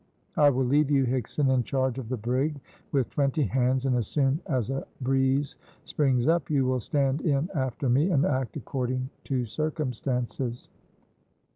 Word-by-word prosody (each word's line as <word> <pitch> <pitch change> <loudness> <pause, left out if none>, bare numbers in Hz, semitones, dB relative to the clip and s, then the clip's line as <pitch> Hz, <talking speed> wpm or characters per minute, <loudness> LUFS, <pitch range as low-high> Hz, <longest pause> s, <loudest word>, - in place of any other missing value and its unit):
I 145 -1 +6
will 130 -1 +1
leave 145 +3 +3
you, 135 -2 +3
Higson, 130 +2 0
in 130 - +3
charge 130 0 -1
of 115 -4 -7
the 130 - -2
brig 130 +7 -1 0.3
with 135 -4 0
twenty 140 +1 +1
hands, 130 0 +1
and 130 -2 +2
as 120 -4 0
soon 140 0 +1
as 130 -4 -1
a 135 - -3
breeze 135 +2 +1 0.3
springs 130 -4 +1
up 165 -4 +2
you 140 -4 +2
will 130 0 +1
stand 140 +3 0
in 150 +2 0
after 130 -2 -2
me, 140 +9 +3
and 150 -6 +3
act 130 -6 -1
according 130 -1 -3
to 130 -3 -1
circumstances." 125 -3 -3
135 Hz, 165 wpm, -27 LUFS, 125-145 Hz, 0.3 s, I